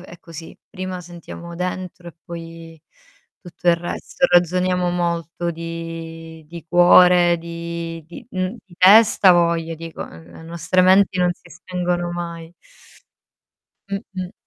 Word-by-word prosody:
è 175 -1 -13
così. 165 -1 -11
Prima 185 0 -6
sentiamo 170 0 -10
dentro, 180 0 -5
e 170 - -13
poi 165 -1 -10 0.6
tutto 175 -1 -5
il 170 - +5
resto, 175 +9 -4
e - - +8
ragione 180 +1 +3
molto 175 -1 -1
di 165 -1 -8
di 170 -1 -10
cuore, 175 0 +6
di 170 0 -6
di 170 - -12
mhmm, 185 -2 -3
di 185 - -19
testa 200 +1 +6
avoja, 170 -2 +3
dico, 165 0 -7
ehm, 80 +1 -14
le - - -12
nostre 170 +2 0
menti 190 +1 +4
non 180 0 +3
si - - -20
spengono 175 -1 -3
mai. 170 -1 -6 1.4
Mh-mh. 195 -2 -5
175 Hz, 135 wpm, -21 LUFS, 165-180 Hz, 1.4 s, e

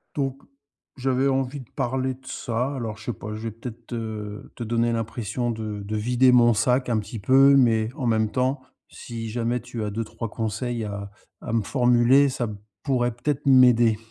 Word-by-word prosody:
Donc, 135 -2 -2 0.6
j'avais 130 +1 +1
envie 135 +1 -1
de 125 - -12
parler 130 0 -1
de 130 +1 -19
ça, 125 +4 -2
alors 115 -5 -4
je 110 - -13
sais 120 - -2
pas, 105 - -9
je 110 - -6
vais 115 -1 -4
peut-être 115 +1 -9
te 110 -3 -6
te - - -5
donner 115 +1 +1
l'impression 115 +1 -2
de 110 -2 -5
de 105 +2 -4
vider 125 +4 +3
mon 120 -1 +6
sac 125 +4 +1
un 115 -2 +2
petit 110 +1 -7
peu, 135 +6 +6
mais 115 -4 +3
en 135 -6 -2
même 110 -1 +1
temps, 130 +2 0 0.3
si 115 -2 -7
jamais 120 +2 -1
tu 115 -2 -6
as 105 - -2
2-3 115 +1 -5
conseils 115 +2 -3
à 100 -1 -6 0.3
à - - -5
me 115 -2 +2
formuler, 125 +4 +4
ça 125 -2 -2 0.4
pourrait, 125 -4 +1
peut-être, 145 +4 -3
m'aider. 125 -4 +6
120 Hz, 185 wpm, -24 LUFS, 110-130 Hz, 0.6 s, mon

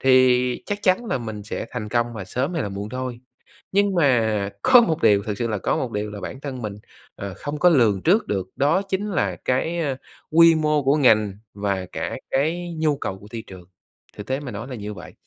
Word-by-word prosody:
thì 125 -1 +4
chắc 205 0 -2
chắn 190 +4 +3
là 135 - -1
mình 110 -3 -6
sẽ 105 - -5
thành 110 -4 -5
công 120 +1 +1
và 100 - -5
sớm 130 - -2
hay 165 - 0
là 105 - -3
muộn 100 +1 -5
thôi. 125 0 -5 0.5
Nhưng 200 0 +2
mà 110 -10 +2
có 245 -2 +7
một 165 -9 0
điều 100 -2 +4
thực 105 -2 -4
sự 120 - -1
là 110 -2 -1
có - - 0
một 125 - -2
điều 105 0 -3
là 105 -1 -8
bản 130 - -6
thân 135 -3 -5
mình, 105 -3 -4 0.4
ờ, 100 -1 -6
không 150 +1 -5
có 180 - +6
lường 115 - +3
trước 200 +7 +3
được, 95 -2 -2
đó 150 +8 +2
chính 200 +1 -3
là 100 - 0
cái, 160 +7 0
a, 140 -5 -1 0.4
quy 165 0 +7
mô 150 -2 +1
của 135 +2 +3
ngành 110 -7 +4 0.2
và 100 -2 -2
cả - - -3 0.2
cái 170 +5 0
nhu 155 -2 +1
cầu 95 -8 -4
của 105 - -14
thị 115 -1 -6
trường, 95 -2 -11 0.5
thực 105 - -8
tế 130 +1 -1
mà 140 -4 -7
nói 110 +5 -6
là 130 - -6
như 105 -1 -6
vậy. 90 -2 -11
125 Hz, 230 wpm, -23 LUFS, 105-155 Hz, 0.5 s, có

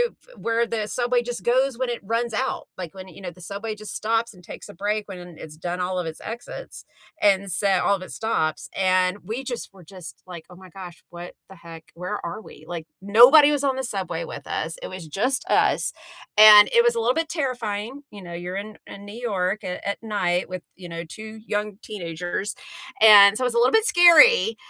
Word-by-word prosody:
f - - -21
where 230 0 0
the 220 -2 -3
subway 245 +1 0
just 240 -5 -6
goes 260 +1 +1
when 260 0 -2
it 240 - -3
runs 230 +3 -2
out, 260 +4 -3
like, 180 -2 -7
when, 190 0 -10
you 180 - -14
know, 180 -2 -6
the 180 - -17
subway 205 +5 -6
just 215 0 -8
stops 225 +1 -1
and 180 - -17
takes 175 - -11
a 205 - -10
break 205 +3 -3
when 180 -3 -10
it's 155 -1 -11
done 175 +2 -4
all 180 0 -2
of 175 - -3
its 160 -1 -8
exits 240 - -8 0.4
and 200 -1 +2
so 200 +4 0 0.2
all 200 - +3
of 190 - -9
its 185 - -8
stops, 160 -9 -2
and 185 0 +2
we, 235 +5 -5
just, 245 -5 -6
were, 185 - -16
just, 165 -6 -12
like, 175 -3 -10
"Oh 180 - -14
my 185 0 -15
gosh. 180 -1 -11
What 175 0 -10 0.2
the 190 - -13
heck? 165 -1 -12
Where 180 +4 -5
are 205 +6 -6
we?" - - -15
like, 165 -2 -7
nobody 250 +9 +7
was 290 -2 0
on 270 -2 +1
the 265 - -3
subway 185 -8 -4
with - - -9
us, 165 +1 -4
it - - -6
was 185 -3 -9
just 250 - -1
us, - - +2 0.5
and 210 -1 +9
it 235 - +6
was 240 0 +2
a 230 - -1
little 235 +2 +1
bit 325 +2 -1
terrifying, 250 -3 -4
you 205 - -11
know, 175 - -10
you're 175 +2 -6
in 210 +2 -7
in 200 - -11
New 205 - -10
York 200 -3 -2
a 180 - -6
at 200 - -3
night 185 -5 -1
with, 185 -1 -6 0.2
you 180 -1 -10
know, 170 0 -6
2 215 +6 -11
young 210 -2 -3
teenagers, 180 +1 -5 0.5
and 210 -1 +8
so 255 - -1
it's 250 - 0
a - - +2
little 240 +2 +4
bit 445 0 +4
scary, 430 +7 +6
205 Hz, 225 wpm, -23 LUFS, 180-235 Hz, 0.5 s, and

